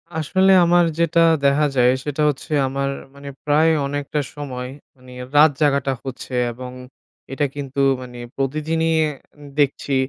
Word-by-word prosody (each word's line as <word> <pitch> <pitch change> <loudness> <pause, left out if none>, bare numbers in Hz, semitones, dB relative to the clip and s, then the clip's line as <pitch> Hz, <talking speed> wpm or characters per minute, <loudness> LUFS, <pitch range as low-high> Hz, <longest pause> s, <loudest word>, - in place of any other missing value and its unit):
আসলে 190 +5 +2
আমার 175 0 +4
যেটা 170 0 +2
দেখা 165 -1 +4
দেখা 140 +2 +3
যায়, 125 -1 +4
সেটা 145 +1 -3
হচ্ছে 145 +1 -6 0.2
আমার 135 +1 -2 0.3
মানে 140 0 -9 0.2
প্রায় 155 +2 +3 0.2
অনেকটা 145 +1 -3 0.2
সময় 130 -4 -6 0.3
মানে 125 0 -15 0.2
রাত 150 +1 +7
জাগাটা 140 -2 +2
হচ্ছে 130 0 -7 0.2
এবং 125 +1 -8 0.6
এটা 145 +2 0
কিন্তু 140 -1 -3 0.2
মানে 125 -1 -10 0.2
প্রতিদিনই 155 +4 -1
অ্যা 150 -2 -2 0.4
দেখছি 140 0 +1
145 Hz, 145 wpm, -21 LUFS, 135-155 Hz, 0.6 s, রাত